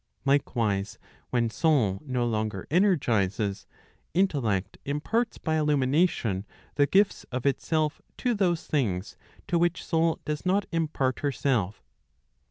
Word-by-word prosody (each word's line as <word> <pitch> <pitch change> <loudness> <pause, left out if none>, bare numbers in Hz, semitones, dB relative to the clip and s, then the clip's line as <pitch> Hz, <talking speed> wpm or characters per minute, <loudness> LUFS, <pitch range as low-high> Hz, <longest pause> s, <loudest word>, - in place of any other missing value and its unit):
Likewise, 115 -8 +1 0.3
when 115 -2 +1
soul 120 - +2
no 125 -4 -1
longer 110 -4 -2
energizes, 110 - +1 0.5
intellect 115 - 0
imparts 220 +12 -1
by 160 0 -1
illumination 145 - +1 0.3
the 145 -1 +3
gifts 200 +4 +3
of 125 0 -5
itself 155 +2 0 0.2
to 250 -2 +1
those 180 -6 +1
things 105 -9 -1 0.3
to 170 - +1
which 175 +1 0
soul 165 -1 +1
does 150 -1 -3
not 190 +2 +2
impart 150 -5 0
herself. 130 -8 -1
140 Hz, 115 wpm, -27 LUFS, 110-165 Hz, 0.5 s, the